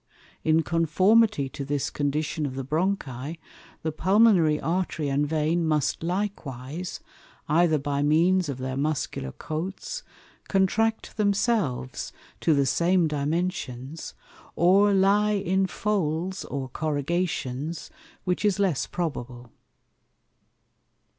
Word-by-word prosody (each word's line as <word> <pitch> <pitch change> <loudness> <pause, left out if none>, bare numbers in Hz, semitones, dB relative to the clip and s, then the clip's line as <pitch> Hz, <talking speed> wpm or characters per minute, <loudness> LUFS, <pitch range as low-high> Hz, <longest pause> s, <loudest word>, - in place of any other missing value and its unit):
In 160 +1 +3
conformity 175 +2 +3
to 140 - -6
this 145 0 -2
condition 150 +1 -1
of 130 - -6
the 135 - -3
Bronchi, 155 -3 -2 0.5
the 160 - -1
Pulmonary 185 -3 +4
Artery 165 -3 -1
and 145 +2 +1
Vein 160 +2 +1
must 155 -3 0
likewise, 170 -4 -4 0.5
either 160 0 +3
by 140 0 -1
means 165 +4 +3
of 135 - -3
their 130 0 -4
Muscular 140 - -2
Coats, 185 - -5 0.5
contract 220 +4 +1
themselves 200 - 0 0.3
to 160 - +3
the 140 -1 +3
same 170 +5 +3
Dimensions, 150 -2 -3 0.4
or 195 +4 +5
lye 200 +2 +3
in 190 -1 +1
Folds 185 -2 -1
or 135 -2 -4
Corrugations, 155 0 -2 0.3
which 180 +1 -1
is 205 -3 +2
less 190 -8 +1
probable. 125 -8 -5
160 Hz, 110 wpm, -26 LUFS, 145-190 Hz, 0.5 s, or